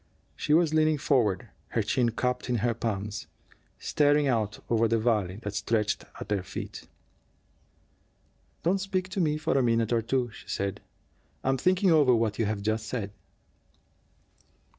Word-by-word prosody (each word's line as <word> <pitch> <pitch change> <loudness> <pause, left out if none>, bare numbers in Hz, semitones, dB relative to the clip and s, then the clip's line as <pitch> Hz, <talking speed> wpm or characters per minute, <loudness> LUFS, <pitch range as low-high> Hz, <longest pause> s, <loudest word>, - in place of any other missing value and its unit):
She 150 - +2
was 165 -2 +3
leaning 155 -1 +3
forward, 120 - +1 0.2
her 115 - 0
chin 120 +3 +2
cupped 125 +2 -2
in 125 - +2
her 120 - +2
palms, 105 -2 -3 0.5
staring 145 0 +2
out 110 -5 0
over 115 0 +3
the 115 +1 +2
valley 110 -5 +1
that 105 - -4
stretched 105 +1 0
at - - -6
their 100 -2 0
feet. 90 - -7 1.8
"Don't 190 +3 +2
speak 185 -1 -2
to 190 0 -1
me 150 -2 +1
for 155 - -1
a 135 - +4
minute 115 -1 +2
or 115 - +3
two," 120 +1 -1
she - - -13
said. 100 0 -2 0.6
"I'm 135 0 +2
thinking 185 +3 +3
over 145 -6 +5
what 110 -2 0
you 115 - +2
have 105 -1 -2
just 110 +1 -1
said." 105 -4 -3
115 Hz, 160 wpm, -28 LUFS, 110-150 Hz, 1.8 s, over